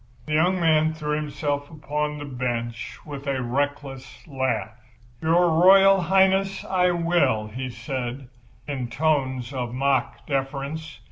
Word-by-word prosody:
The 155 - -4
young 180 +4 +3
man 160 -1 +3
threw 150 -1 -2
himself 145 -1 -3
upon 150 -1 -3
the 145 - -6
bench 120 -3 -4
with 145 -1 -8
a 135 -1 0
reckless 135 +1 -4
laugh. 130 -6 -2 0.5
"Your 170 +2 +3
Royal 195 +1 +7
Highness, 190 +2 +2
I 180 -1 +2
will," 170 -11 +1
he 130 +4 -5
said, 125 +1 -5 0.4
in 135 -4 -3
tones 130 -2 0
of 125 -2 -4
mock 135 +1 0
deference. 140 +2 -3
145 Hz, 130 wpm, -24 LUFS, 130-160 Hz, 0.5 s, Royal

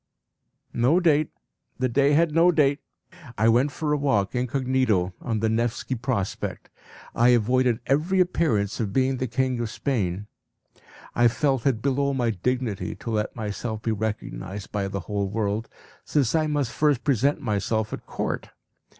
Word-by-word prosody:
No 125 +9 +3
date. 155 -4 +3 0.5
The 130 - +1
day 140 +4 +3
had 160 +1 +3
no 170 +2 +5
date. 145 -3 +2 0.6
I 110 +2 +3
went 125 +5 +3
for 150 0 -1
a - - +2
walk 130 -9 +1
incognito 125 -7 +1
on 110 -3 -2
the 110 - +2
Nevski 115 +3 -1
Prospect. 115 -5 -3 0.4
I 120 +1 +4
avoided 125 0 +3
every 160 +8 +1
appearance 125 - +1
of 105 -4 -2
being 130 +1 +2
the 130 - -2
king 130 +1 0
of 115 -2 -2
Spain. 105 -7 -2 0.9
I 120 - +4
felt 135 +1 +1
it 115 -5 0
below 140 0 +1
my 120 -3 +1
dignity 110 -2 -2
to 115 - -6
let 105 -1 -1
myself 110 0 -4
be 115 - 0
recognised 105 -2 -4
by 100 -2 -1
the 100 0 -4
whole 100 +1 -2
world, 105 +1 -2 0.3
since 135 -6 +1
I 155 -1 +2
must 145 -5 -1
first 145 -3 +1
present 140 +1 +2
myself 110 -2 -1
at - - -7
court. - - -3
120 Hz, 160 wpm, -25 LUFS, 110-140 Hz, 0.9 s, no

